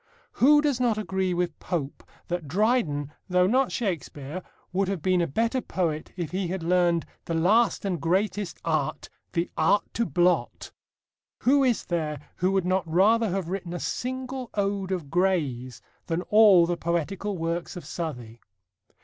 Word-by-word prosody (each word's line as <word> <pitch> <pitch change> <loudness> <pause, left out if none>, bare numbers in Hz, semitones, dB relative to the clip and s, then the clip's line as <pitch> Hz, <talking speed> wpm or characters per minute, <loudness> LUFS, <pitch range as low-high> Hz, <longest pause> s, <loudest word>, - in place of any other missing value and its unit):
Who 295 +4 +5
does 290 -4 0
not 240 -4 +2
agree 190 -3 -1
with 175 -2 -2
Pope 155 -6 -4 0.2
that 175 -3 -3
Dryden, 165 - +1 0.2
though 180 0 +4
not 255 +7 +2
Shakespeare, 170 - -4 0.3
would 195 +1 +1
have 190 -5 -3
been 185 -1 +3
a 170 - +1
better 230 - 0
poet 160 -8 -2
if 170 -4 -3
he 185 0 -1
had 180 0 -4
learned: 175 -1 +2 0.2
The 165 - -2
last 205 +7 +3
and 180 -6 -2
greatest 190 +3 0
art 155 -4 -1 0.2
the 170 -1 -1
art 165 +6 +3
to 235 -1 0
blot? 175 +4 +1 0.7
Who 275 +2 +4
is 250 -4 +1
there 155 -4 -2 0.2
who 185 +2 +1
would 195 -2 +1
not 185 -3 0
rather 215 +6 +4
have 185 -2 -2
written 185 -2 -4
a - - -3
single 260 +2 -4
ode 200 -2 -1
of 170 -7 -3
Gray's 150 -10 0 0.2
than 170 +1 -1
all 210 -5 +7
the 175 0 -1
poetical 180 +4 -2
works 170 +1 -3
of 175 -5 -8
Southey? 125 -9 -6
180 Hz, 160 wpm, -26 LUFS, 165-205 Hz, 0.7 s, all